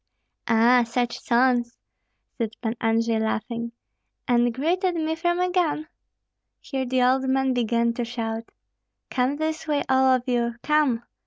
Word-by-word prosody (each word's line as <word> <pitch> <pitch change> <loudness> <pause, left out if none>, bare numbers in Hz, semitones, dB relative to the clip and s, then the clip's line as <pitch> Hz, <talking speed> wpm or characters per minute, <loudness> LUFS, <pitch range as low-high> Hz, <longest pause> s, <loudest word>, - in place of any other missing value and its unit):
"Ah! 235 +2 +5
such 240 +1 -2
sons," 240 0 +1 0.6
said 225 -2 -3
Pan 225 -1 -3
Andrei, 225 0 +1
laughing, 230 +2 -3 0.6
"and 240 -1 +3
greeted 350 - 0
me 320 -1 -1
from 345 +2 0
a 360 0 +1
gun?" 315 -4 0 0.7
Here 265 -2 -4
the 255 0 +1
old 260 +1 +2
man 265 0 +2
began 235 -1 +1
to 240 - -3
shout, 230 -1 -4 0.6
"Come 255 +2 +1
this 315 +1 -3
way, 295 -2 +1
all 265 0 +3
of 255 -2 +3
you! 235 -1 0
Come!" 295 -6 +2
250 Hz, 145 wpm, -24 LUFS, 235-290 Hz, 0.7 s, Ah